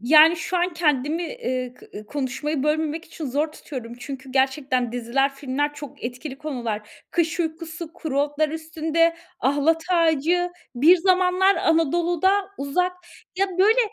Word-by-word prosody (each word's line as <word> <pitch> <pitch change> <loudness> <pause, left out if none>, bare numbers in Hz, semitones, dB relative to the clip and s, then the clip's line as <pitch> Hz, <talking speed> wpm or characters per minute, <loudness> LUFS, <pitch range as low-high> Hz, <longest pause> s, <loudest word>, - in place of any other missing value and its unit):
Yani 310 +7 +7
şu 360 +2 -2
an 355 +1 +1
kendimi, 300 0 +1
eee, 255 - -3
kı 210 -3 -11
konuşmayı 285 +2 -2
bölmemek 310 +1 0
için 320 -1 -7
zor 295 +4 -1
tutuyorum. 240 -7 -8
Çünkü 265 0 -8
gerçekten 265 -2 +1
diziler, 245 +3 0
filmler 290 +2 -2
çok 290 -2 -10
etkili 260 +3 -6
konular. 235 -8 -5
Kış 335 0 0
Uykusu, 325 0 -4
Kuru 285 -5 -2
Otlar 295 +1 +1
Üstünde, 320 +1 0 0.2
Ahlat 290 +4 +2
Ağacı, 335 +1 +2 0.2
Bir 310 +9 +6
Zamanlar 370 +2 +3
Anadolu'da, 340 +3 +2 0.3
Uzak. 360 +7 0 0.5
Ya 390 - +3
böyle 430 +5 +5
305 Hz, 135 wpm, -23 LUFS, 270-335 Hz, 0.5 s, Yani